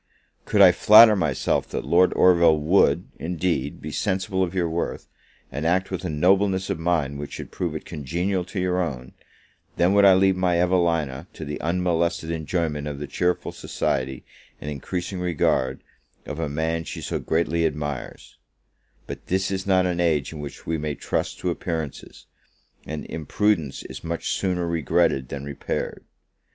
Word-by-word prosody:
Could 105 Hz, -, +2 dB
I 90 Hz, -, +9 dB
flatter 105 Hz, +4 st, +8 dB
myself 70 Hz, -8 st, 0 dB
that -, -, -4 dB
Lord 90 Hz, +2 st, +4 dB
Orville 85 Hz, -3 st, +5 dB
would, 80 Hz, +6 st, +3 dB
indeed, 80 Hz, -5 st, -2 dB
be -, -, -5 dB
sensible 95 Hz, 0 st, -1 dB
of 95 Hz, 0 st, -1 dB
your 90 Hz, -2 st, +1 dB
worth, 85 Hz, +1 st, -3 dB, 0.4 s
and 70 Hz, +3 st, -4 dB
act 90 Hz, +4 st, +1 dB
with 95 Hz, -, -4 dB
a 90 Hz, -, -2 dB
nobleness 95 Hz, +4 st, +2 dB
of 95 Hz, -, -3 dB
mind 80 Hz, -5 st, 0 dB
which 75 Hz, -, -7 dB
should -, -, -7 dB
prove -, -, -3 dB
it -, -, -6 dB
congenial 90 Hz, +6 st, -2 dB
to 95 Hz, -, -5 dB
your 90 Hz, 0 st, +1 dB
own, 65 Hz, -7 st, -5 dB, 0.6 s
then 90 Hz, +3 st, +3 dB
would 100 Hz, 0 st, +5 dB
I 95 Hz, -2 st, +8 dB
leave 95 Hz, 0 st, +4 dB
my 90 Hz, -2 st, +1 dB
Evelina 85 Hz, -6 st, +1 dB
to -, -, -7 dB
the 75 Hz, 0 st, -5 dB
unmolested 85 Hz, -1 st, 0 dB
enjoyment 80 Hz, -2 st, -2 dB
of 75 Hz, -1 st, -5 dB
the 75 Hz, -, -5 dB
cheerful 90 Hz, +5 st, -1 dB
society, 65 Hz, -1 st, -3 dB, 0.3 s
and 75 Hz, -, -5 dB
increasing 90 Hz, +6 st, -4 dB
regard, 70 Hz, -6 st, 0 dB, 0.4 s
of 75 Hz, +1 st, -6 dB
a 80 Hz, -3 st, -2 dB
man 80 Hz, +3 st, -1 dB
she -, -, -7 dB
so -, -, -3 dB
greatly 85 Hz, 0 st, +1 dB
admires: 75 Hz, -3 st, -6 dB, 0.7 s
but -, -, -8 dB
this 95 Hz, +1 st, 0 dB
is 95 Hz, 0 st, -3 dB
not 95 Hz, -1 st, +3 dB
an 90 Hz, -1 st, -1 dB
age 80 Hz, -4 st, +1 dB
in 75 Hz, -, -8 dB
which 75 Hz, -1 st, -8 dB
we 80 Hz, -1 st, -1 dB
may 75 Hz, -1 st, -3 dB
trust -, -, -2 dB
to 90 Hz, -, 0 dB
appearances; 80 Hz, -4 st, -5 dB, 0.6 s
and 75 Hz, -1 st, -5 dB
imprudence 80 Hz, -1 st, -1 dB
is 65 Hz, +1 st, -9 dB
much 85 Hz, 0 st, -3 dB
sooner 90 Hz, -2 st, -1 dB
regretted 80 Hz, -4 st, +1 dB
than 70 Hz, 0 st, -6 dB
repaired. 70 Hz, -1 st, -4 dB
85 Hz, 165 wpm, -24 LUFS, 75-90 Hz, 0.7 s, I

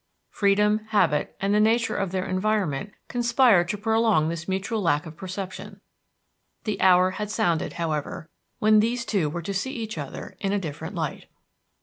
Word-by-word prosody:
Freedom, 210 Hz, +1 st, +3 dB
habit, 175 Hz, -9 st, +1 dB
and 195 Hz, +2 st, 0 dB
the 210 Hz, -, +4 dB
nature 225 Hz, +2 st, +2 dB
of 195 Hz, -3 st, -1 dB
their 185 Hz, 0 st, -2 dB
environment 190 Hz, -4 st, -1 dB, 0.2 s
conspired 235 Hz, -7 st, +3 dB
to 210 Hz, -, -1 dB
prolong 220 Hz, -6 st, +2 dB
this 170 Hz, 0 st, -5 dB
mutual 195 Hz, +4 st, -2 dB
lack 150 Hz, -5 st, +1 dB
of 160 Hz, -1 st, -9 dB
perception. 190 Hz, +3 st, -7 dB, 0.8 s
The 215 Hz, -2 st, -3 dB
hour 185 Hz, 0 st, +5 dB
had 210 Hz, +2 st, -4 dB
sounded, 175 Hz, -7 st, 0 dB
however, 160 Hz, -2 st, -3 dB, 0.3 s
when 215 Hz, 0 st, +5 dB
these 235 Hz, +3 st, 0 dB
two 190 Hz, -10 st, 0 dB
were 170 Hz, +3 st, -5 dB
to 200 Hz, -, -3 dB
see 260 Hz, +8 st, -2 dB
each 220 Hz, -7 st, -5 dB
other 140 Hz, -2 st, -7 dB
in 195 Hz, 0 st, -1 dB
a 205 Hz, -, +1 dB
different 160 Hz, 0 st, -6 dB
light. 160 Hz, -4 st, -4 dB
195 Hz, 165 wpm, -25 LUFS, 170-215 Hz, 0.8 s, hour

